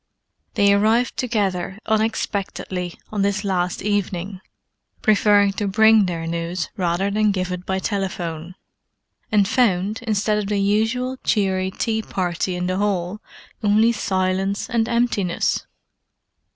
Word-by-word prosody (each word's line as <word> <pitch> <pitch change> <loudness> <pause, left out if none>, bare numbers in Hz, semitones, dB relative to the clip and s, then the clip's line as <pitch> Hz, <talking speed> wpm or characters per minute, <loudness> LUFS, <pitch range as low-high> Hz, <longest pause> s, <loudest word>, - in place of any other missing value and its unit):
They 200 -2 +4
arrived 220 +4 +2
together 195 -6 -1
unexpectedly 200 -4 -2 0.2
on 210 -2 -1
this 200 +1 0
last 180 -3 -1
evening, 195 -2 -2 0.6
preferring 205 -1 +4
to 205 - 0
bring 220 0 +5
their 165 -2 -3
news 170 +1 -3
rather 180 +2 0
than 215 +1 +2
give 185 -2 -1
it 180 0 -5
by 190 - 0
telephone; 185 -4 -3 0.8
and 205 -2 +4
found, 210 -3 +1
instead 215 -1 0
of 205 - -3
the 205 0 0
usual 225 +6 0
cheery 190 -3 +1
tea 220 +3 -1
party 180 -2 -2
in 180 0 -2
the 185 +1 -1
hall, 200 0 -1 0.4
only 215 +3 +4
silence 190 -2 -1
and 230 0 +1
emptiness. 235 -7 0
200 Hz, 125 wpm, -22 LUFS, 185-215 Hz, 0.8 s, bring